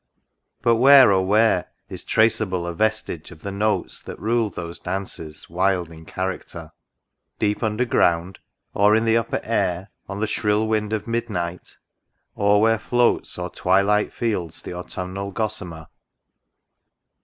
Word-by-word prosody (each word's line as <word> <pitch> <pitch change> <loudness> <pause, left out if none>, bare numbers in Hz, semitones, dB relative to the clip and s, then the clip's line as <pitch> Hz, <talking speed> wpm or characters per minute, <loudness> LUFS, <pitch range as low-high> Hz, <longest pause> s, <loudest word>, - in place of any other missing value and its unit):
— - - -53
But, 115 -1 +4
where, 135 -1 +8
oh 95 -1 +3
where 105 -1 +2 0.2
Is - - -6
traceable 105 -5 +1
a 85 - -3
vestige 110 -4 -1
of 80 -3 -14
the 100 - -4
notes 105 +2 -1
That - - -9
ruled 115 -1 0
those 85 0 -6
dances, 90 -4 -5
wild 90 -1 0
in 80 0 -12
character? 90 -3 -5 0.3
— - - -58 0.3
Deep 105 -1 0
underground? 105 -6 +1 0.2
— - - -53
Or 105 +1 +4
in 110 +1 +2
the 115 0 +3
upper 115 0 0
air, 95 -4 -1 0.2
On 100 0 -5
the 110 - +1
shrill 105 0 0
wind 110 -1 0
of 110 -2 -2
midnight? 100 -7 -4 0.6
or 100 0 +3
where 115 0 +3
floats 120 +1 +1
O'er - - -4
twilight 100 +3 +2
fields 95 -9 -3
the - - -6
autumnal 90 +2 -5
gossamer 95 -6 -4
100 Hz, 150 wpm, -22 LUFS, 90-110 Hz, 0.6 s, where